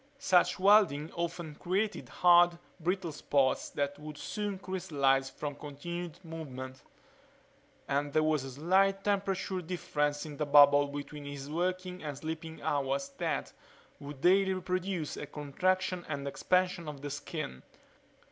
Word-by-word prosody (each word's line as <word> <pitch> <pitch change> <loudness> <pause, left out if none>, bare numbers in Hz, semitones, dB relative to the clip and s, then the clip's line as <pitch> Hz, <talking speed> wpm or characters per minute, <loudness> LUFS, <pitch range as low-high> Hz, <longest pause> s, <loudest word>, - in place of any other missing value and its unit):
Such 190 -11 +3
welding 190 -7 +4
often 170 -2 -3
created 185 - -2
hard, 175 +2 +5 0.2
brittle 175 0 -1
spots 140 -2 +1
that 145 0 -2
would 150 0 -8
soon 205 +2 -3
crystallize 145 -8 +1
from 145 +2 -5
continued 155 +4 -6
movement 130 -5 -7 1.1
and 145 +1 0
there 155 +2 +3
was 155 -3 +2
a 135 - -6
slight 190 +8 +2
temperature 195 -2 0
difference 150 -4 -1
in 150 -2 -8
the 150 - 0
bubble 145 0 +7
between 145 +1 -7
his 140 0 -7
working 180 +2 -2
and 145 -3 -5
sleeping 160 +2 -6
hours 140 -1 0
that 165 -5 -2 0.5
would 140 -1 -9
daily 190 +2 +4
produce 180 -3 -2
a 150 - -5
contraction 180 +6 -1
and 140 -2 -3
expansion 180 +3 +1
of 145 -2 -8
the 145 - -4
skin. 145 - -5
155 Hz, 135 wpm, -31 LUFS, 145-185 Hz, 1.1 s, bubble